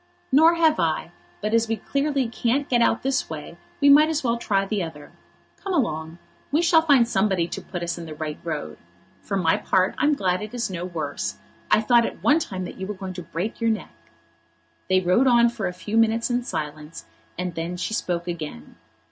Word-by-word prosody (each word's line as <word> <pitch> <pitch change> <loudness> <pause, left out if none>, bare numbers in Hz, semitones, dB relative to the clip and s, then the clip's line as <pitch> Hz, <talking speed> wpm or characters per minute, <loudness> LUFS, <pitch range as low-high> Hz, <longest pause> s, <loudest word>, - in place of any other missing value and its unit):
"Nor 320 +5 +6
have 320 -2 +3
I; 165 +1 0 0.3
but 210 +1 -2
as 230 0 +3
we 225 - 0
clearly 275 +1 -1
can't 245 +5 0
get 240 -2 +2
out - - +2
this 270 0 0
way - - -7 0.2
we 285 - +4
might 295 +2 +7
as 310 -2 -1
well 235 -2 +1
try 200 -4 0
the 205 0 -2
other. 155 -4 -7 0.5
Come 390 -1 -4
along. 160 - -1 0.3
We 310 +4 +2
shall 335 -1 +5
find 280 -7 +4
somebody 190 -5 +1
to - - -5
put 175 -2 -6
us 170 0 -3
in 165 - -7
the 155 - -7
right 155 -1 -5
road. 75 - -5 0.4
For 195 - -3
my 165 -4 +2
part 185 0 +1
I'm 295 0 +3
glad 185 -5 0
it 215 +3 -7
is 235 -5 -2
no 175 -1 -4
worse. 145 - -4 0.3
I - - +4
thought 235 +1 +4
at - - -9
one 300 +3 +5
time 185 - -4
that - - -9
you 190 - -4
were 210 - -4
going 190 -1 -6
to 180 - -6
break 180 +8 -5
your 230 - +2
neck." 220 -4 -3 1.0
They 185 0 +4
rode 185 +9 +3
on 235 -1 +5
for 225 -5 -3
a - - -2
few 205 +5 -4
minutes 225 +1 +2
in 245 +1 +1
silence, 155 -4 -6 0.3
and 180 0 -3
then 165 +2 -4
she 185 +5 -3
spoke 175 -4 -2
again. 155 - -6
200 Hz, 215 wpm, -24 LUFS, 170-245 Hz, 1.0 s, might